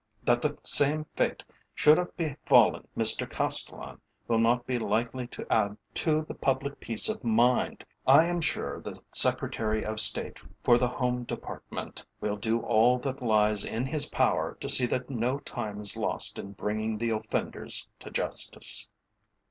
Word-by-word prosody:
That 120 0 +2
the 150 +1 -2
same 150 +2 +3
fate - - -1 0.3
should 150 +2 +5
have 180 - -5
befallen 155 -5 +2
Mr - - +4
Castellan - - +1 0.3
will 115 -1 +1
not 120 +2 +2
be 125 -2 -2
likely 120 +2 -2
to - - -9
add 105 -1 0 0.2
to 155 -1 0
the - - -8
public 135 +1 -2
peace 115 -2 +1
of 215 -6 -3
mind. 120 +2 +1 0.2
I 160 - +7
am 175 0 -2
sure 160 -1 -3
the - - -8
Secretary 110 -1 +2
of 110 0 -3
State 105 0 +3 0.2
for 120 0 +4
the 125 - +1
Home 125 0 -2
Department - - -8 0.2
will 105 -1 -2
do 110 +3 -1
all 120 +3 +3
that 135 +1 -5
lies 105 -3 +2
in 115 +3 -3
his 145 +1 -1
power - - 0
to - - -5
see 125 - +5
that 125 +2 -3
no 125 +2 -1
time 110 -7 -6
is 100 -2 +2
lost - - -1
in 100 - -8
bringing 110 +2 -3
the 115 +1 -2
offenders 110 -1 -3
to - - -10
justice." - - +1
120 Hz, 165 wpm, -28 LUFS, 110-140 Hz, 0.3 s, I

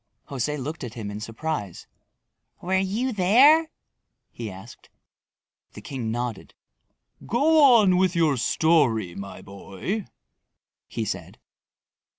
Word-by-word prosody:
José 140 +2 -2
looked 145 +3 -6
at 120 -1 -7
him 105 -3 -6
in 105 - -6
surprise. 115 - -5 0.7
"Were 185 +2 -2
you 220 +7 -1
there?" 265 - +5 0.6
he 115 -2 -7
asked. 95 0 -13 0.8
The - - -10
king 125 -5 -5
nodded. 120 -1 -5 0.7
"Go 300 +7 +3
on 195 -5 +4
with 185 -1 +2
your 160 -4 +2
story, 120 - +2
my 100 +1 -9
boy," 100 - -6 0.8
he - - -4
said. - - -6
150 Hz, 115 wpm, -24 LUFS, -, 0.8 s, there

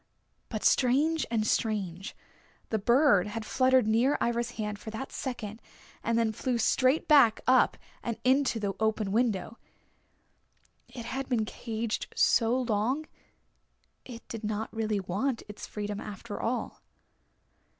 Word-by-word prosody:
But - - -4
strange 290 +5 +3
and 225 -2 0
strange, 195 -5 -1 0.5
the 220 - 0
bird 235 -3 +4
had 215 +1 -5
fluttered 260 -1 +3
near 230 +6 +3
Ivra's 235 0 0
hand 210 -2 -3
for - - -8
that 225 +5 -6
second, 225 -4 -5 0.4
and 230 0 +1
then 230 -1 +2
flew 245 +3 -1
straight 255 +5 +2
back 275 -8 +6
up 255 0 +4 0.2
and 230 -2 -3
into 260 -2 +2
the 200 -2 -2
open 220 -2 0
window. 225 -1 0 1.3
It 245 -1 -9
had 265 +3 -4
been 230 -4 +1
caged 225 0 -4
so 235 +2 +3
long 240 +7 0 1.0
it 235 -2 -11
did 225 -1 -7
not 215 +1 -3
really 215 -2 0
want 210 +8 -2
its 210 - -8
freedom 205 -1 -4
after 205 +1 -7
all. 245 +2 -3
230 Hz, 135 wpm, -29 LUFS, 215-255 Hz, 1.3 s, back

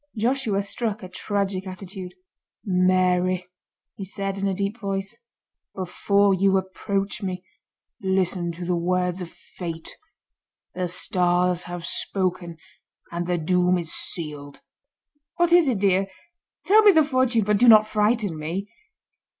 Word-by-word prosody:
Joshua 225 -3 0
struck 215 0 -3
a - - -6
tragic 195 0 -2
attitude. 185 0 -8 0.5
"Mary," 185 -1 +2 0.5
he 195 - -8
said 195 0 -4
in 200 - 0
a 195 - 0
deep 200 +4 -3
voice, 195 +2 -4 0.6
"before 200 +2 +2
you 195 +1 +3
approach 195 +2 -3
me, 185 -1 -4 0.6
listen 185 -2 0
to 175 +1 -7
the 180 0 0
words 180 +1 0
of 175 - -6
Fate. 165 -2 -8 0.8
The 180 -1 -2
Stars 180 0 +1
have 175 -1 -6
spoken 180 -3 -1 0.5
and 170 0 -3
the 180 -1 0
doom 180 +2 +2
is 170 -2 -4
sealed." 150 -4 -4 0.7
"What 345 0 +2
is 350 -3 +6
it, 250 -5 +1
dear? 195 0 +2 0.6
Tell 425 +3 +6
me 420 -1 +8
the 320 -4 +5
fortune, 255 -5 +1
but 210 0 +1
do 245 - +5
not 215 -2 +8
frighten 210 -5 0
me." 175 +7 -4
190 Hz, 135 wpm, -24 LUFS, 180-205 Hz, 0.8 s, me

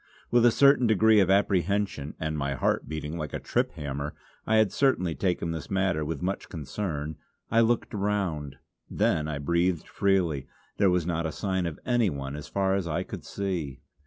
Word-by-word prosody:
With 120 0 +6
a - - +5
certain 140 -1 +5
degree 110 0 +5
of 95 -2 +3
apprehension, 95 -5 +1
and 80 0 -2
my 70 -2 -1
heart - - 0
beating 80 +1 -4
like 75 -4 -5
a - - -2
trip - - -1
hammer 70 0 -4 0.3
I 110 - +3
had 110 -3 +4
certainly 100 -9 +2
taken 90 -2 -1
this 80 -3 -5
matter 95 -5 +1
with 75 0 -4
much 95 +2 -3
concern 80 -1 -4 0.3
I 115 - +5
looked 115 0 +1
around. 95 -9 -2 0.3
Then 75 -1 +1
I 75 -2 -3
breathed 85 +3 0
freely; 85 -8 +1 0.3
there 100 -2 +4
was 90 -2 +1
not 85 -1 -1
a - - -4
sign 95 0 -1
of 80 - -6
anyone 85 - 0
as 75 - -7
far 95 -1 0
as 95 -3 -1
I 85 +3 -1
could - - -8
see. 85 -9 -4
90 Hz, 185 wpm, -27 LUFS, 75-100 Hz, 0.3 s, With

